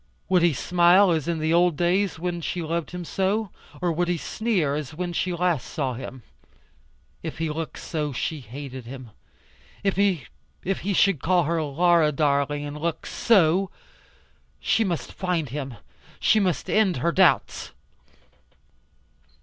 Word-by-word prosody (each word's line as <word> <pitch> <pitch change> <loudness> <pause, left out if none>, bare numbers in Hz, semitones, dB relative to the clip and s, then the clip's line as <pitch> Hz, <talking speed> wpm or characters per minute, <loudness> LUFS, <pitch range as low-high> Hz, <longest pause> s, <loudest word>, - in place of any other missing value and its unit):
Would 185 -2 +4
he 170 0 +4
smile 180 +6 +4
as 160 -3 0
in 170 -1 0
the 160 +1 0
old 175 -2 +3
days 180 +1 +1
when 175 +1 -3
she 175 +1 -3
loved 165 0 -2
him 180 -1 -6
so; 195 +3 -1 0.3
or 175 - +2
would 175 +2 0
he 175 0 0
sneer 185 -6 -1
as 150 0 -4
when 175 +1 -3
she 180 +2 -1
last 175 -5 0
saw 135 -4 -2
him? 130 0 -8 1.0
If - - -6
he 160 -1 -1
looked 160 +1 -5
so, 150 -3 -3
she 150 +4 -3
hated 130 0 -8
him. 130 -2 -9 0.7
If 195 -1 +1
he 195 - -2
should 190 -8 +3
call 180 0 +3
her 165 +1 0
"Laura, 160 +1 +3
darling," 145 0 +1
and 145 +1 -6
look 165 +1 -3
SO! 190 -3 +3 0.9
She 225 - +2
must 175 -6 -3
find 180 -6 -1
him. 135 -1 -5 0.4
She 220 - +4
must 185 -5 0
end 205 -7 +2
her 170 +7 +1
doubts. 185 +1 +2
170 Hz, 150 wpm, -25 LUFS, 150-180 Hz, 1.0 s, Would